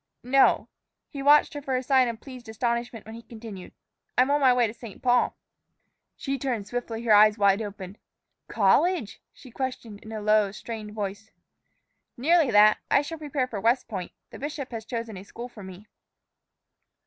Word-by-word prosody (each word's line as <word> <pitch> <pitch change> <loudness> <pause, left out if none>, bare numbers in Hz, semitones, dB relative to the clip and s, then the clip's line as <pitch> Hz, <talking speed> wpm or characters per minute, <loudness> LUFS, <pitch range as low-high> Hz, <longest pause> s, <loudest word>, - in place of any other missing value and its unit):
"No." 270 +2 +3 0.4
He 280 - -7
watched 295 +3 +5
her 290 - -6
for 270 -2 -2
a 255 - -1
sign 260 -1 +3
of 230 -2 -5
pleased 250 -3 -11
astonishment 235 0 -3
when 220 - -10
he 230 - -9
continued, 220 -5 -10 0.5
"I'm 255 +2 +4
on 290 0 +2
my 260 -2 +6
way 245 -1 +3
to 215 - -4
St. 230 -4 -11
Paul." 245 -1 +2 0.8
She 275 -1 -3
turned 240 -6 -2
swiftly, 235 0 -5
her 225 -2 +4
eyes 210 +1 +6
open 200 0 +4
wide. 200 -2 -7 0.5
"College?" 265 - +1
she 255 - -15
questioned 240 -5 -5
in 220 - -12
a 220 - -4
low, 210 -1 +2
strained 215 0 -7
voice. 205 +1 -5 0.9
"Nearly 315 +3 +3
that; 210 -1 +6
I 280 - +4
shall 325 +2 -7
prepare 290 -3 -2
for 220 -6 -6
West 235 +4 +2
Point. 190 -5 -6 0.2
The - - -10
bishop 285 -2 -5
has 225 -2 -6
chosen 230 -3 -5
a 185 - -9
school 235 +4 -9
for 235 -4 -13
me." 190 +1 -11
235 Hz, 180 wpm, -26 LUFS, 210-260 Hz, 0.9 s, my